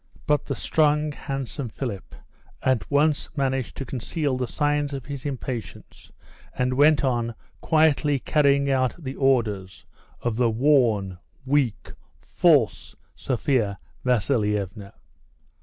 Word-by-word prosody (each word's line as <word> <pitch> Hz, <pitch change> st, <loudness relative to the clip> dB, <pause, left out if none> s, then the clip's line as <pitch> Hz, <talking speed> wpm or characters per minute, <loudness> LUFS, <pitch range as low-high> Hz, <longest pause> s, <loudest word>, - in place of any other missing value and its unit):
But 150 Hz, -1 st, +1 dB
the -, -, -3 dB
strong, 150 Hz, -1 st, +1 dB
handsome 135 Hz, -2 st, -5 dB
Philip 105 Hz, -4 st, -6 dB, 0.5 s
at 130 Hz, -3 st, +1 dB
once 145 Hz, +1 st, +2 dB
managed 135 Hz, -2 st, -1 dB
to 135 Hz, -, -4 dB
conceal 135 Hz, +3 st, -2 dB
the 125 Hz, -1 st, -2 dB
signs 145 Hz, +1 st, 0 dB
of 135 Hz, -3 st, -7 dB
his 140 Hz, +1 st, -5 dB
impatience, 125 Hz, -4 st, -7 dB, 0.5 s
and 125 Hz, 0 st, +1 dB
went 145 Hz, +3 st, +4 dB
on 120 Hz, -3 st, 0 dB, 0.3 s
quietly 155 Hz, -2 st, +3 dB
carrying 140 Hz, 0 st, +2 dB
out 130 Hz, -2 st, +1 dB
the 135 Hz, -6 st, -6 dB
orders 110 Hz, -9 st, 0 dB, 0.4 s
of 120 Hz, -2 st, -1 dB
the 120 Hz, -1 st, +3 dB
worn, 110 Hz, -7 st, +2 dB, 0.3 s
weak, 135 Hz, -5 st, 0 dB, 0.3 s
false 135 Hz, -, +2 dB, 0.2 s
Sophia 120 Hz, -5 st, 0 dB, 0.3 s
Vasilievna. 105 Hz, -5 st, -1 dB
130 Hz, 115 wpm, -24 LUFS, 115-145 Hz, 0.5 s, went